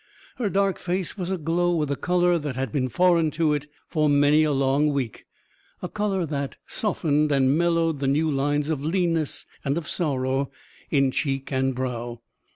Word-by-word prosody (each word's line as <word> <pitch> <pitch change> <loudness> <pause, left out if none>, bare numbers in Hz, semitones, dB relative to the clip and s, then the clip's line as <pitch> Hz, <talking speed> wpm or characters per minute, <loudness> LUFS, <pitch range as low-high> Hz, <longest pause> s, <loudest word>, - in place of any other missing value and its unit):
Her 230 -5 0
dark 195 0 +1
face 180 0 -2
was 180 -3 -4
aglow 175 0 0
with 150 -3 0
a - - +1
colour 175 +2 +2
that 145 -4 -4
had 130 -3 -2
been 130 -3 0
foreign 170 +1 +3
to 160 -3 +3
it 150 0 -3 0.2
for 155 -2 +1
many 145 +2 +4
a 155 - +2
long 140 +2 +2
week 130 -6 -3 0.6
a - - -1
colour 200 -3 -1
that 140 -3 -3
softened 150 -8 0
and 135 0 +3
mellowed 165 -2 +1
the 135 - -1
new 155 +3 +2
lines 145 +2 0
of 145 -3 -2
leanness 165 -2 0 0.2
and 140 +3 0
of 170 - -4
sorrow 135 -4 -1 0.4
in 135 -3 +3
cheek 135 0 -2
and 130 -1 0
brow. 120 -2 -4
150 Hz, 175 wpm, -25 LUFS, 135-170 Hz, 0.6 s, many